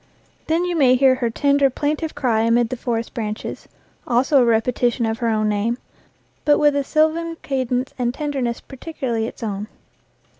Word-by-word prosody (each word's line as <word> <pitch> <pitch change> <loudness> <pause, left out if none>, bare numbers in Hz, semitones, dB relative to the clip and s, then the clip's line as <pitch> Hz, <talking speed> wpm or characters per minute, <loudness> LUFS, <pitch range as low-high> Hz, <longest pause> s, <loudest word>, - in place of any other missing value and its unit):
Then 330 +3 +1
you 355 -1 -1
may 260 -5 +5
hear 265 0 +5
her 255 -2 -1
tender, 280 +3 +2
plaintive 300 +4 -2
cry 230 -5 +1
amid 230 +1 +2
the 255 - -3
forest 235 -2 -3
branches 215 -2 -5 0.4
also 260 +3 +3
a - - +4
repetition 235 +1 +1
of 225 0 -2
her 235 - 0
own 215 -1 +1
name, 210 +3 0 0.7
but 295 -1 +4
with 295 -1 +3
a 285 - +1
sylvan 320 +3 +1
cadence 255 -1 -1
and 240 -1 +1
tenderness 265 -4 -3
peculiarly 260 -5 -4
its - - -9
own. 210 -1 -3
250 Hz, 165 wpm, -21 LUFS, 230-285 Hz, 0.7 s, may